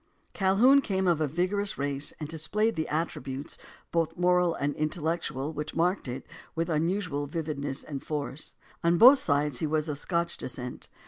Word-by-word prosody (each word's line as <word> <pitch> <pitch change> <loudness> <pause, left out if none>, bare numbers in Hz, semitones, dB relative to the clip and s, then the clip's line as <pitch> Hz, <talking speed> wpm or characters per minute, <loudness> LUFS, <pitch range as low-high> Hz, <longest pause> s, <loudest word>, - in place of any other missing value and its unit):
Calhoun 240 +6 +5
came 190 -6 0
of 170 -3 +3
a 155 - +2
vigorous 185 +7 0
race 140 0 -2
and 150 - -4
displayed 190 +8 0
the 160 0 -2
at 160 +2 0
tributes, 135 +2 -5 0.4
both 165 0 0
moral 180 -1 +3
and 145 0 -1
intellectual, 155 -2 -2
which 150 0 -5
marked 180 0 +1
it, 125 +2 -5 0.3
with 165 +1 -1
unusual 160 -2 0
vividness 145 -3 -3
and 140 -3 -6
force. 150 -1 -4 0.3
On 170 +1 +4
both 260 +8 +9
sides 145 - +1
he 160 - 0
was 155 +1 0
of 145 -2 -3
Scotch 170 0 -1
descent. 125 -1 -5
160 Hz, 170 wpm, -28 LUFS, 145-180 Hz, 0.4 s, both